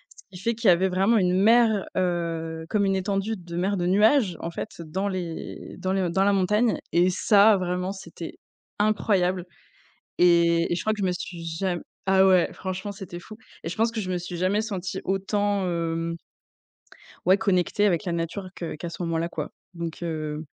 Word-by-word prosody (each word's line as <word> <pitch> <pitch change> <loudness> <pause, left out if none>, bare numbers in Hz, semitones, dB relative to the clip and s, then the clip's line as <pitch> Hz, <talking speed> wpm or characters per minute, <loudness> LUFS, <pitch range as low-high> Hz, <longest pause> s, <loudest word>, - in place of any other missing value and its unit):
ce - - -14
qui 180 - -12
fait 230 +2 +1
qu'il 225 -2 +3
y - - +9
avait 180 +2 +3
vraiment 195 +5 +3
une 180 -2 +2
mer, 225 -2 +5
heu, 165 -3 -2
comme 205 -2 +2
une 195 0 +2
étendue 195 +3 -1
de 175 -2 -9
mer 190 +3 +1
de 175 - -1
nuages, 205 - +4
en 170 - -4
fait, - - -5
dans 170 +5 -3
les 175 -3 -6
dans 185 - -1
les 190 -3 +1
dans 190 +3 +2
la 205 - +4
montagne 210 +5 +2
et 175 +2 +4
ça 205 +3 +5
vraiment, 180 +1 -2
c'était 170 -4 -8 0.4
incroyable 195 -4 +2 0.8
et 170 -1 +4
et 170 - +2
je - - -2
crois 215 - +1
que 210 - -7
je 190 - +1
me 180 - +1
suis 175 -1 -6 0.2
ja 185 -2 0 0.3
ah 190 0 +5
ouais, 185 -2 +4
franchement, 190 +2 -5
c'était 190 -3 -8
fou! 215 +4 -12 0.3
et 165 - -3
je - - -5
pense 225 +1 +3
que 225 - -3
je 185 -2 -4
me 180 - 0
suis 175 0 -6
jamais 185 +4 +1
sentie 190 -3 -4
autant, 200 +1 0
hem 165 -1 -2 1.1
ouais, 185 +2 +6
connectée 200 0 +1
avec 180 -3 +2
la 175 - -1
nature 170 +3 -3
que 170 -4 -5
qu'à 170 +3 -6
ce 170 - -8
moment-là, 165 0 -1
quoi, 155 -3 -4 0.3
donc 170 0 -5
heu 155 -2 -4
185 Hz, 200 wpm, -25 LUFS, 170-200 Hz, 1.1 s, y